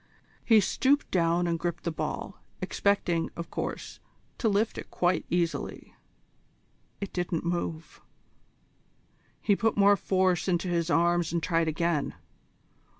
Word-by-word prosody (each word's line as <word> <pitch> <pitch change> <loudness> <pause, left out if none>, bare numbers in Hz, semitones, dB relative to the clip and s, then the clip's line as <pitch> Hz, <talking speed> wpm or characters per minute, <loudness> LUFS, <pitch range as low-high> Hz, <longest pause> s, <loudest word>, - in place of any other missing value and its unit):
He 225 -2 +6
stooped 275 +8 +1
down 170 -1 +2
and 170 -1 0
gripped 170 0 -3
the 170 - -1
ball, 160 - -5 0.2
expecting, 175 -5 0
of 170 0 -7
course, - - -5 0.4
to 225 - +2
lift 210 +2 +1
it - - -9
quite 175 0 +1
easily. 170 -1 -2 1.1
It 200 - -5
didn't 175 -2 -2
move. 170 -2 -3 1.4
He 205 - +2
put 225 +1 0
more 200 0 +6
force 185 -2 +1
into 180 0 0
his 170 -1 0
arms 170 0 +2
and 170 -1 -1
tried 165 -2 +1
again. 160 -1 0
175 Hz, 130 wpm, -28 LUFS, 170-195 Hz, 1.4 s, He